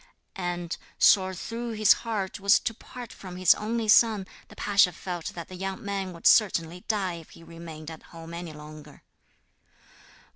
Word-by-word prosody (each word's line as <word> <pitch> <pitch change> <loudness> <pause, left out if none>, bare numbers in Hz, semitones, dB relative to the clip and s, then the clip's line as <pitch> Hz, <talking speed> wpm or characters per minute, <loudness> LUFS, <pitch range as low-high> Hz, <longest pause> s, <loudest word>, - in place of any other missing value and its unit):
And, 175 -1 -3 0.2
sore 190 -1 +5
though 230 +5 -5
his 215 0 +6
heart 210 -4 -3
was 200 0 +5
to 225 - -2
part 245 +1 -10
from 185 -2 -10
his 185 -1 +6
only 225 +1 -3
son, 215 -2 +5 0.2
the - - -15
pasha 200 -3 +3
felt 175 0 -5
that 170 - -7
the - - -12
young 195 +2 -5
man 195 -2 -3
would 170 -1 -13
certainly 180 -5 +3
die 190 -5 -1
if 165 - -15
he 165 - -15
remained 165 -2 -9
at 160 - -10
home 165 0 -10
any 170 -1 -6
longer. 150 0 -12
185 Hz, 170 wpm, -27 LUFS, 170-210 Hz, 0.2 s, his